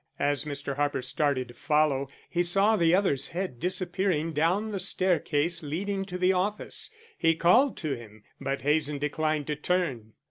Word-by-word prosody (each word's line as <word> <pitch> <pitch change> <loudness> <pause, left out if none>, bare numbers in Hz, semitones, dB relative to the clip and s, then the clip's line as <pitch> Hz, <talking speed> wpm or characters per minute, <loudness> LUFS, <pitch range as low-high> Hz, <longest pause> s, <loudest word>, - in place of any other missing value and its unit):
As 145 +1 0
Mr. 140 -1 -4
Harper 145 -3 0
started 130 -1 0
to - - -11
follow, 145 -1 +1 0.2
he 175 - 0
saw 195 +5 +3
the 170 -3 +4
other's 165 -9 +1
head 180 -8 -4
disappearing 180 -2 -1
down 180 +8 +1
the 200 - -3
staircase 175 -3 +1
leading 195 +6 -3
to 180 -1 -5
the 185 +1 +3
office. 200 +3 -1 0.3
He 165 0 +3
called 235 - +4
to 155 -4 -2
him, 110 -4 -10 0.2
but 135 0 -3
Hazen 150 0 +2
declined 150 +1 -1
to 150 - -2
turn. 150 -9 -1
160 Hz, 165 wpm, -28 LUFS, 145-185 Hz, 0.3 s, the